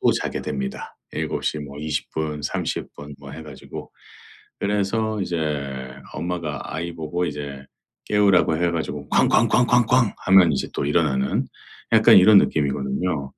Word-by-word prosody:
또 -, -, +4 dB
자게 -, -, -3 dB
됩니다 65 Hz, -1 st, -5 dB, 0.2 s
7:00 75 Hz, -, -2 dB
뭐 70 Hz, 0 st, -9 dB
20 75 Hz, -1 st, -3 dB
분, 75 Hz, -1 st, -3 dB
30 75 Hz, -, -3 dB
분 70 Hz, 0 st, -10 dB
뭐 70 Hz, -1 st, -10 dB
해 80 Hz, +2 st, -8 dB
가지고. 70 Hz, -4 st, -10 dB, 0.7 s
그래서 105 Hz, +2 st, 0 dB
이제 70 Hz, -7 st, -3 dB, 0.2 s
엄마가 85 Hz, -4 st, -4 dB
아이 85 Hz, +2 st, -4 dB
보고 85 Hz, +2 st, -2 dB
이제 70 Hz, -2 st, -6 dB, 0.4 s
깨우라고 100 Hz, -6 st, +3 dB
해 85 Hz, +1 st, +1 dB
가지고 75 Hz, -3 st, -4 dB
"쾅쾅쾅쾅쾅." 125 Hz, -1 st, +3 dB
하면 95 Hz, -4 st, +6 dB
이제 70 Hz, -, -2 dB
또 -, -, -2 dB
일어나는 70 Hz, -3 st, +1 dB, 0.5 s
약간 -, -, +7 dB
이런 100 Hz, +2 st, +8 dB
느낌이거든요. 70 Hz, +1 st, -1 dB
80 Hz, 270 characters per minute, -22 LUFS, 70-90 Hz, 0.7 s, 이런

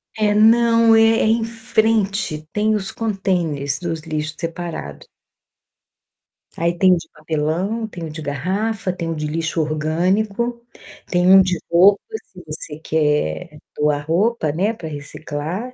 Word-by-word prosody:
É, 210 Hz, -1 st, +2 dB
não, 230 Hz, +1 st, +5 dB
é 225 Hz, -, +6 dB, 0.2 s
é -, -, +2 dB
em 225 Hz, +1 st, +2 dB
frente, 220 Hz, -8 st, 0 dB
tem 215 Hz, +1 st, +2 dB
os 195 Hz, -2 st, -3 dB
contêineres 180 Hz, -10 st, -1 dB
dos 165 Hz, -3 st, -4 dB
lixo 155 Hz, -1 st, -4 dB
separado. 165 Hz, -, -6 dB, 1.5 s
Aí 170 Hz, +1 st, -1 dB
tem 185 Hz, 0 st, +5 dB
o -, -, +3 dB
de -, -, -9 dB
papelão, 160 Hz, +9 st, -2 dB
tem 175 Hz, -5 st, -7 dB
o -, -, -6 dB
de 155 Hz, +1 st, -7 dB
garrafa, 185 Hz, +8 st, -2 dB
tem 170 Hz, -2 st, -4 dB
o -, -, -3 dB
de 150 Hz, 0 st, -3 dB
lixo 160 Hz, +1 st, -1 dB
orgânico, 190 Hz, +10 st, 0 dB, 0.5 s
tem 180 Hz, 0 st, +1 dB
um 190 Hz, 0 st, +9 dB
de 180 Hz, -2 st, 0 dB
roupa, 190 Hz, +4 st, +5 dB, 0.2 s
se 185 Hz, -3 st, -14 dB
você 155 Hz, 0 st, -7 dB
quer 150 Hz, -, -1 dB, 0.2 s
doar 150 Hz, -1 st, 0 dB
roupa, 185 Hz, -1 st, +1 dB
né, 195 Hz, +9 st, 0 dB
para 170 Hz, -7 st, -8 dB
reciclar, 155 Hz, -, -6 dB
175 Hz, 145 wpm, -20 LUFS, 155-215 Hz, 1.5 s, um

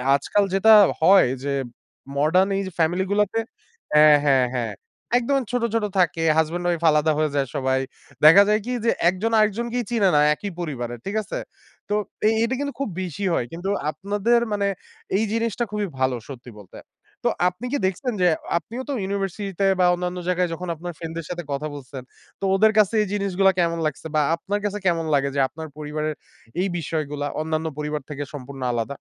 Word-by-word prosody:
আজকাল 200 Hz, +9 st, +1 dB
যেটা 220 Hz, +3 st, +6 dB, 0.3 s
হয় 190 Hz, -2 st, +6 dB, 0.2 s
যে, 140 Hz, -1 st, -1 dB, 0.6 s
মডার্ন 180 Hz, +7 st, +3 dB
এই -, -, 0 dB, 0.2 s
ফ্যামিলি 175 Hz, +3 st, +1 dB
গুলাতে 210 Hz, +2 st, +1 dB, 0.5 s
হ্যাঁ, 150 Hz, -1 st, +7 dB
হ্যাঁ, 135 Hz, -3 st, +4 dB
হ্যাঁ। 115 Hz, -4 st, -2 dB, 0.4 s
একদম 275 Hz, +3 st, +1 dB
ছোট, 245 Hz, -1 st, 0 dB
ছোট 225 Hz, -2 st, +1 dB
থাকে। 165 Hz, -2 st, +2 dB
হাসব্যান্ড 170 Hz, +3 st, 0 dB
ওয়াইফ 170 Hz, -1 st, 0 dB
আলাদা 150 Hz, +1 st, +3 dB
হয়ে 155 Hz, -2 st, +1 dB
যায় 140 Hz, -1 st, +1 dB
সবাই। 130 Hz, 0 st, +1 dB, 0.5 s
দেখা 180 Hz, +6 st, +9 dB
যায় 215 Hz, +1 st, +3 dB
কি 250 Hz, -, -3 dB
যে, -, -, +4 dB, 0.2 s
একজন 205 Hz, +5 st, -2 dB
আরেকজনকেই 235 Hz, +3 st, 0 dB
চিনে 210 Hz, -5 st, +3 dB
না -, -, +5 dB
একই 200 Hz, +6 st, -6 dB
পরিবারে, 120 Hz, -8 st, -4 dB
ঠিক 200 Hz, +2 st, -4 dB
আছে? -, -, -5 dB, 0.5 s
তো 205 Hz, -, 0 dB, 0.3 s
এই 220 Hz, -, +4 dB
এটা 240 Hz, +3 st, 0 dB
কিন্তু 285 Hz, -2 st, -3 dB
খুব 275 Hz, -, -2 dB
বেশি 185 Hz, +2 st, -4 dB
হয়। 120 Hz, -, 0 dB
কিন্তু 175 Hz, +4 st, -4 dB, 0.2 s
আপনাদের 205 Hz, +6 st, +1 dB
মানে 200 Hz, -1 st, 0 dB, 0.5 s
এই 220 Hz, -, +1 dB
জিনিসটা 230 Hz, 0 st, -1 dB
খুবই 210 Hz, -1 st, -2 dB
ভালো 130 Hz, -1 st, +1 dB
সত্যি 125 Hz, -3 st, -10 dB
বলতে। 100 Hz, -, -14 dB, 0.5 s
তো -, -, +3 dB, 0.2 s
আপনি 180 Hz, +8 st, -9 dB
কি 285 Hz, -, +1 dB
দেখছেন 235 Hz, +7 st, -1 dB
যে, 180 Hz, -, +5 dB, 0.3 s
আপনিও 235 Hz, +8 st, -6 dB
তো 280 Hz, -, -1 dB
ইউনিভার্সিটি 195 Hz, 0 st, -3 dB
তে 195 Hz, -, +3 dB
বা 180 Hz, -, +5 dB
অন্যান্য 180 Hz, 0 st, -4 dB
জায়গায় 180 Hz, -1 st, +1 dB
যখন 180 Hz, +2 st, -6 dB
আপনার 175 Hz, +2 st, -7 dB
ফ্রেন্ডদের 165 Hz, -1 st, -6 dB
সাথে 175 Hz, -1 st, -4 dB
কথা 145 Hz, +2 st, -3 dB
বলছেন। 135 Hz, -1 st, -8 dB, 0.4 s
তো -, -, -11 dB
ওদের 215 Hz, +3 st, +5 dB
কাছে 215 Hz, 0 st, +4 dB
এই 210 Hz, -, -1 dB
জিনিসগুলা 195 Hz, -1 st, +2 dB
কেমন 170 Hz, -1 st, +1 dB
লাগছে? 155 Hz, +2 st, -3 dB
বা 150 Hz, -, +4 dB
আপনার 205 Hz, +4 st, -3 dB
কাছে 205 Hz, 0 st, -2 dB
কেমন 165 Hz, -2 st, +1 dB
লাগে, 140 Hz, -1 st, +2 dB
যে -, -, 0 dB
আপনার 160 Hz, +3 st, -8 dB
পরিবারের 155 Hz, 0 st, -3 dB, 0.5 s
এই 195 Hz, -, +1 dB
বিষয়গুলা 150 Hz, -2 st, -3 dB
অন্যান্য 160 Hz, 0 st, -2 dB
পরিবার 150 Hz, -1 st, -3 dB
থেকে 145 Hz, 0 st, -4 dB
সম্পূর্ণ 135 Hz, -1 st, -8 dB
আলাদা? 120 Hz, +4 st, -3 dB
175 Hz, 185 wpm, -23 LUFS, 150-205 Hz, 0.6 s, দেখা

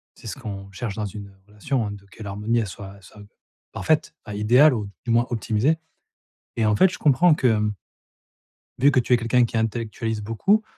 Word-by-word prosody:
c'est -, -, -12 dB
ce -, -, -5 dB
qu'on 100 Hz, -2 st, -7 dB
cherche 100 Hz, +1 st, -5 dB
dans 105 Hz, -1 st, -3 dB
une 100 Hz, -1 st, -9 dB
relation, 105 Hz, +2 st, -2 dB
de 100 Hz, -1 st, -10 dB
que -, -, -14 dB
l'harmonie 105 Hz, +4 st, -1 dB
elle 110 Hz, -, -2 dB
soit-elle 100 Hz, 0 st, -10 dB
soit 105 Hz, +2 st, -15 dB, 0.5 s
parfaite, -, -, 0 dB
à 105 Hz, -, -6 dB
idéale 125 Hz, +8 st, +5 dB
ou 105 Hz, -4 st, -3 dB, 0.2 s
du 115 Hz, -, -1 dB
moins 120 Hz, +1 st, +3 dB
optimisée. 120 Hz, +6 st, +1 dB, 0.8 s
Et 110 Hz, -, +2 dB
en 105 Hz, -1 st, +3 dB
fait, 190 Hz, -, +5 dB
je -, -, -7 dB
comprends 155 Hz, +4 st, +4 dB
que 110 Hz, -5 st, +2 dB, 1.1 s
vu 140 Hz, +3 st, +5 dB
que 130 Hz, -, +3 dB
tu 125 Hz, +1 st, +1 dB
es -, -, +6 dB
quelqu'un 120 Hz, +1 st, +2 dB
qui 115 Hz, -, -3 dB
intellectualise 110 Hz, 0 st, -2 dB
beaucoup, 190 Hz, -, +1 dB
110 Hz, 190 wpm, -23 LUFS, 105-125 Hz, 1.1 s, es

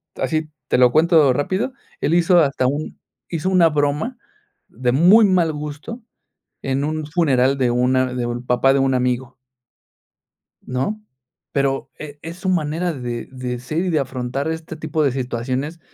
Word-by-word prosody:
así, 155 Hz, -1 st, -2 dB, 0.2 s
te -, -, +2 dB
lo 125 Hz, -1 st, +5 dB
cuento 155 Hz, -3 st, +4 dB
rápido, 185 Hz, -, -1 dB, 0.3 s
él 150 Hz, -, +1 dB
hizo 175 Hz, +1 st, +4 dB
hasta 140 Hz, -4 st, +2 dB
un 145 Hz, +4 st, -3 dB, 0.3 s
hizo 170 Hz, +2 st, -2 dB
una 180 Hz, -3 st, +5 dB
broma, 150 Hz, -, -1 dB, 0.5 s
de 125 Hz, -1 st, -1 dB
muy 180 Hz, -, +6 dB
mal 180 Hz, -4 st, +2 dB
gusto, 150 Hz, +10 st, -7 dB, 0.6 s
en 135 Hz, +1 st, -1 dB
un 155 Hz, +1 st, -2 dB
funeral 140 Hz, -4 st, +2 dB
de 130 Hz, -2 st, +2 dB
una 125 Hz, +1 st, +1 dB
de 125 Hz, -1 st, -2 dB
un 120 Hz, +1 st, -4 dB
papá 125 Hz, +2 st, +3 dB
de 140 Hz, -, +2 dB
un 135 Hz, 0 st, +2 dB
amigo. 125 Hz, 0 st, -1 dB, 1.3 s
¿No? 135 Hz, +13 st, -3 dB, 0.5 s
Pero 135 Hz, -1 st, -1 dB
e 145 Hz, -1 st, -9 dB
es 165 Hz, +2 st, -8 dB
su 185 Hz, +1 st, -3 dB
manera 170 Hz, 0 st, 0 dB
de 120 Hz, -4 st, -5 dB
de 125 Hz, -2 st, -5 dB
ser 130 Hz, +6 st, -3 dB
y -, -, 0 dB
de 155 Hz, -3 st, +2 dB
afrontar 130 Hz, +1 st, -3 dB
este 160 Hz, 0 st, -5 dB
tipo 155 Hz, 0 st, -2 dB
de 140 Hz, -, +2 dB
situaciones, 130 Hz, +5 st, -3 dB
145 Hz, 160 wpm, -20 LUFS, 130-165 Hz, 1.3 s, muy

